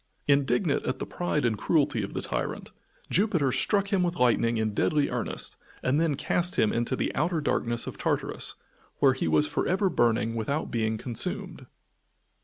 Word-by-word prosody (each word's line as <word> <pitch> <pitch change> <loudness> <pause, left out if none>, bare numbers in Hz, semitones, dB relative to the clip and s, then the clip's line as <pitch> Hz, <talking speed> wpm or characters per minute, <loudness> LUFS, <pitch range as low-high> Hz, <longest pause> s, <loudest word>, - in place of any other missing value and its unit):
Indignant 140 +3 +2
at 130 - -1
the - - -4
pride 150 -6 -1
and 115 -2 +2
cruelty 145 0 +1
of 100 - -6
the - - -2
tyrant, - - -3 0.4
Jupiter 175 -9 +2
struck 200 - +1
him 190 - +3
with 175 -1 0
lightning 115 -3 +2
in 110 -1 0
deadly 145 +6 +1
earnest - - -3 0.3
and 140 +5 +2
then 160 -4 +1
cast 175 +5 +1
him 110 - +2
into 120 +2 0
the - - -2
outer 165 +3 0
darkness 120 -5 -1
of - - -7
Tartarus, - - -2 0.4
where 135 -2 +4
he 130 - -2
was 80 -1 +3
for - - -1
ever 190 +1 +1
burning 115 -1 +2
without 140 +7 -2
being 110 -1 0
consumed. 115 0 -2
135 Hz, 175 wpm, -27 LUFS, 115-165 Hz, 0.4 s, where